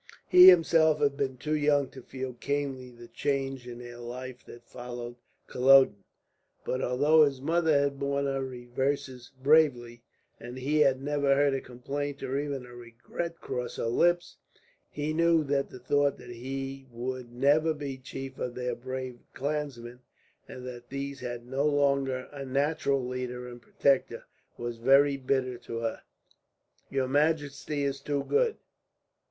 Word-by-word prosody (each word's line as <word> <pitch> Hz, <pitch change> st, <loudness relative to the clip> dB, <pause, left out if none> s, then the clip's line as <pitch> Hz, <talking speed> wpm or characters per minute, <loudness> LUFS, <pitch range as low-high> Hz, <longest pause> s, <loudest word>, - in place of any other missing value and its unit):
He 180 Hz, +1 st, +10 dB
himself 165 Hz, -3 st, +5 dB
had 140 Hz, -1 st, +2 dB
been 130 Hz, -2 st, -2 dB
too 150 Hz, +5 st, -3 dB
young 145 Hz, -2 st, +2 dB
to 130 Hz, -, -11 dB
feel 130 Hz, +1 st, -6 dB
keenly 135 Hz, 0 st, -3 dB
the 120 Hz, -1 st, -13 dB
change 135 Hz, +1 st, -2 dB
in 120 Hz, -1 st, -7 dB
their 120 Hz, 0 st, -10 dB
life 125 Hz, +1 st, -7 dB
that 120 Hz, 0 st, -12 dB
followed 120 Hz, -1 st, -7 dB, 0.3 s
Culloden; 130 Hz, -5 st, +5 dB, 0.6 s
but 130 Hz, -, -1 dB
although 145 Hz, +5 st, +4 dB
his 140 Hz, -3 st, +1 dB
mother 160 Hz, +1 st, +2 dB
had 140 Hz, -1 st, -1 dB
borne 140 Hz, 0 st, 0 dB
her 135 Hz, -1 st, -1 dB
reverses 130 Hz, 0 st, -3 dB
bravely, 130 Hz, -6 st, +3 dB, 0.4 s
and 120 Hz, +1 st, -8 dB
he 145 Hz, +4 st, 0 dB
had 135 Hz, -2 st, +3 dB
never 145 Hz, -1 st, +2 dB
heard 140 Hz, 0 st, +3 dB
a 135 Hz, -, -1 dB
complaint 140 Hz, +3 st, -5 dB
or 135 Hz, +2 st, -1 dB
even 140 Hz, -3 st, -4 dB
a 120 Hz, -, -13 dB
regret 120 Hz, +8 st, -6 dB
cross 125 Hz, 0 st, -4 dB
her -, -, -3 dB
lips, 175 Hz, +9 st, +1 dB, 0.5 s
he 150 Hz, +1 st, -3 dB
knew 165 Hz, 0 st, +3 dB
that 140 Hz, -1 st, 0 dB
the -, -, -10 dB
thought 140 Hz, +3 st, +1 dB
that 120 Hz, -, -11 dB
he 135 Hz, +2 st, -6 dB
would 125 Hz, +1 st, -5 dB
never 145 Hz, +6 st, +3 dB
be 145 Hz, -3 st, -5 dB
chief 135 Hz, +1 st, -8 dB
of 125 Hz, -1 st, -3 dB
their 125 Hz, -1 st, -2 dB
brave 130 Hz, 0 st, -6 dB, 0.2 s
clansmen, 135 Hz, -4 st, -4 dB, 0.5 s
and 125 Hz, 0 st, -9 dB
that 120 Hz, -1 st, -9 dB
these 140 Hz, 0 st, -5 dB
had 120 Hz, -1 st, -6 dB
no 135 Hz, +4 st, 0 dB
longer 140 Hz, -3 st, +1 dB
a 145 Hz, -1 st, -7 dB
natural 140 Hz, 0 st, 0 dB
leader 125 Hz, 0 st, -4 dB
and 120 Hz, -1 st, -10 dB
protector, 135 Hz, +2 st, +1 dB, 0.3 s
was 120 Hz, -1 st, -5 dB
very 135 Hz, +4 st, +5 dB
bitter 130 Hz, -2 st, -1 dB
to 115 Hz, -, -6 dB
her. 115 Hz, -1 st, -3 dB, 0.9 s
"Your 135 Hz, -1 st, 0 dB
majesty 145 Hz, 0 st, 0 dB
is 140 Hz, -1 st, -2 dB
too 140 Hz, 0 st, -1 dB
good. 460 Hz, -1 st, +1 dB
135 Hz, 155 wpm, -29 LUFS, 125-145 Hz, 0.9 s, He